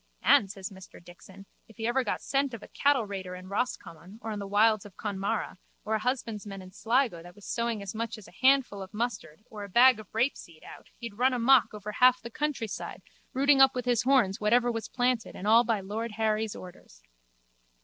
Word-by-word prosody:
And, 195 - +5
says 195 +1 -7
Mr 190 -1 -13
Dixon, 185 +3 -14 0.2
if 225 - -19
ever 240 +4 0
he - - +1
got - - -3
scent 275 -2 0
of 215 - -11
a - - -10
cattleraider 200 -10 -1
in 185 +1 -11
Roscommon 195 -4 -4
or 220 -1 -4
the 200 -1 -5
wilds 215 +1 +3
of 205 -3 -14
Connemara 200 0 -3 0.3
or 220 - -2
a 220 - +1
husbandman 215 -4 -3
in 185 0 -12
Sligo 230 -3 0
that 175 +1 -13
was 205 - -15
sowing 235 -3 -2
as 195 - -6
much 230 +1 -4
as 215 - -13
a - - -15
handful 260 -6 +3
of 190 +2 -10
mustard 220 -6 -4
or 210 -2 -7
a 200 - -8
bag 245 +3 +6
of 215 - -11
rapeseed 220 - -2
out - - -12
he'd 230 -2 -8
run 260 +1 +3
amok 250 0 +4
over 210 0 -7
half 250 +3 +4
the 235 - -9
countryside 255 -7 -4 0.3
rooting 275 +1 +4
up 270 -1 +6
with 250 -1 -3
his 245 -2 +2
horns 245 -8 +2
whatever 240 +3 +3
was 225 -1 -5
planted 245 -2 -1
and 185 - -7
all 225 +3 +6
by 225 -4 0
lord 215 +3 -5
Harry's 220 0 -1
orders. 120 - -13
220 Hz, 205 wpm, -28 LUFS, 200-245 Hz, 0.3 s, bag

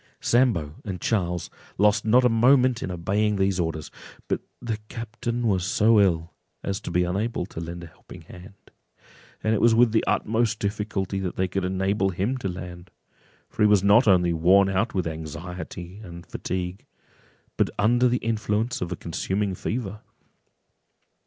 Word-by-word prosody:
Sambo 105 - +1
and 95 -3 -5
Charles 90 -4 -1 0.3
lost 105 +2 +3
not 125 +3 +5
a - - +7
moment 125 +1 +4
in - - -3
obeying 100 +4 0
these 95 -1 +1
orders; 80 -3 -3 0.4
but - - -1 0.2
the 115 -3 -3
captain 120 +1 -4
was 95 -5 +1
so 105 +3 +4
ill, 85 -4 +1 0.3
as 100 0 -2
to - - -6
be 90 - +2
unable 95 +3 -2
to 90 - -9
lend 85 +1 -6
a - - -7
helping 80 - -14
hand; 95 +3 -14 0.7
and 110 - +2
it 110 - +1
was 115 -1 +5
with 120 -1 +5
the 110 - +2
utmost 115 0 +1
difficulty 100 -2 -2
that 95 -2 -3
they 95 - 0
could 95 +1 -2
enable 95 +1 0
him 95 +8 -1
to 100 - -3
land, 90 0 -8 0.6
for - - -7
he 105 - +7
was 105 -2 +4
not 105 +5 +5
only 90 -3 +4
worn 95 +4 +4
out 95 +5 0
with 90 -2 0
anxiety 85 +3 -7
and 85 -5 -10
fatigue, 90 +1 -5 0.7
but - - +1
under 120 +4 +3
the 125 0 +2
influence 110 +1 -1
of 90 -1 -3
a - - -1
consuming 95 +4 -2
fever. 105 +1 -4
100 Hz, 165 wpm, -25 LUFS, 90-110 Hz, 0.7 s, a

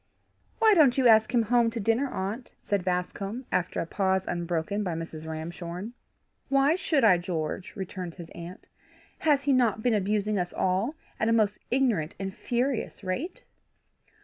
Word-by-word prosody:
"Why 445 -2 +6
don't 295 -9 +5
you 260 -2 +5
ask 220 -1 +6
him 240 -3 +3
home 235 +1 +3
to 230 - -5
dinner, 225 +6 +1
aunt?" 210 +6 -4
said 200 -3 0
Bascombe, 195 +6 -2
after 180 - 0
a - - -1
pause 190 +1 0
unbroken 175 +3 -2
by 175 -4 -2
Mrs. 160 -1 -6
Ramshorn. 170 +6 -6 0.6
"Why 275 +2 +4
should 315 -6 +1
I, 185 -6 +6
George?" 175 +1 -4
returned 185 -3 -6
his 170 -3 -10
aunt. 170 +3 -9 0.5
"Has 290 -3 +3
he 280 0 +3
not 230 -4 +2
been 245 - +3
abusing 210 0 +1
us 175 -1 -3
all 195 +11 0 0.2
at 220 - +2
a - - +3
most 215 -2 +2
ignorant 235 - +1
and 195 -1 -4
furious 245 0 -2
rate?" 320 - -4
205 Hz, 165 wpm, -27 LUFS, 180-245 Hz, 0.6 s, Why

